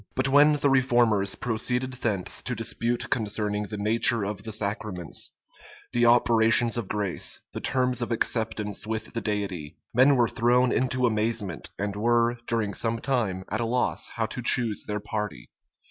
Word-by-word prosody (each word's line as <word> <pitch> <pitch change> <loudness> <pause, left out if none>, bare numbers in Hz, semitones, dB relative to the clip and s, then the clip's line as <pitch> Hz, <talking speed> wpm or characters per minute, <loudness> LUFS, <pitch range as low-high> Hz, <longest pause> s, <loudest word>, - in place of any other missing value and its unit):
But 130 +2 0
when 145 +2 +6
the 145 -1 +2
reformers 120 -7 +3
proceeded 125 +2 -2
thence 105 -7 -1
to 125 - -3
dispute 115 +1 -2
concerning 105 -2 -1
the 105 - -6
nature 110 +1 +3
of 100 0 -4
the 110 +1 -6
sacraments, 100 -4 -3 0.6
the 120 0 +3
operations 115 -1 +4
of 120 -5 -2
grace, 100 -3 -1
the - - -5
terms 125 -1 +1
of 120 - -3
acceptance 110 -2 -1
with 110 0 -4
the 115 - -3
Deity, 100 -8 -4 0.2
men 130 +4 +5
were 120 -2 +3
thrown 120 +2 +2
into 130 0 +1
amazement, 110 - -1
and 100 +1 -3
were, 120 +2 +1
during 110 -3 -1
some 115 +2 0
time, 115 -7 -1
at 110 +3 -1
a - - 0
loss 125 +2 0
how 115 - 0
to 120 +3 -6
choose 120 -2 +2
their 105 0 -2
party. 105 - -5
115 Hz, 160 wpm, -26 LUFS, 105-120 Hz, 0.6 s, when